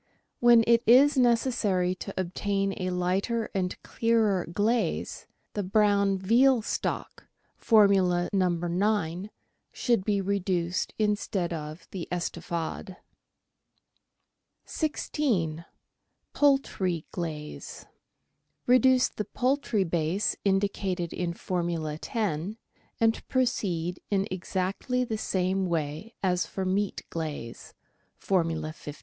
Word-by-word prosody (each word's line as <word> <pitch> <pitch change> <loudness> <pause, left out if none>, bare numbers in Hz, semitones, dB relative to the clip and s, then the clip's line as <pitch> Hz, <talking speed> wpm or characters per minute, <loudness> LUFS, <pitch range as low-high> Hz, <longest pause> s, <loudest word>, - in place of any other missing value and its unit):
When 240 -1 +6
it 235 0 +4
is 275 +6 +7
necessary 230 -7 +2
to 185 +2 -7
obtain 195 +2 -1
a 185 - -1
lighter 190 +6 -1
and 185 -2 -2
clearer 220 -5 +1
glaze, 220 +6 -1 0.3
the 205 - -1
brown 200 0 +2
veal 235 +5 +4
stock - - -4 0.3
(Formula 195 -5 +4
No. 185 -2 +3
9) 175 +1 -1 0.4
should 235 -6 +1
be 205 0 +1
reduced 185 -3 -1
instead 205 -4 0
of 155 +1 -7
the 185 -4 -5
" - - -36
Estouffade." 175 +1 -4 1.7
16— 210 - -1 0.7
POULTRY 200 - +1
QLAZE 155 -4 -6 0.8
Reduce 255 +1 +5
the 210 - -5
poultry 250 -2 0
base 170 +3 0
indicated 195 -3 0
in 175 -1 -2
Formula 170 -4 -3
10, 205 -2 -2 0.4
and 225 0 +1
proceed 180 -9 -1
in 200 0 +1
exactly 190 +7 -1
the 220 -3 -3
same 190 0 0
way 160 +6 -3
as 180 0 +1
for 190 - -4
meat 195 +2 -1
glaze 155 -8 -6 0.4
(Formula 165 -4 -1
15). 150 -2 -10
195 Hz, 105 wpm, -27 LUFS, 175-220 Hz, 1.7 s, is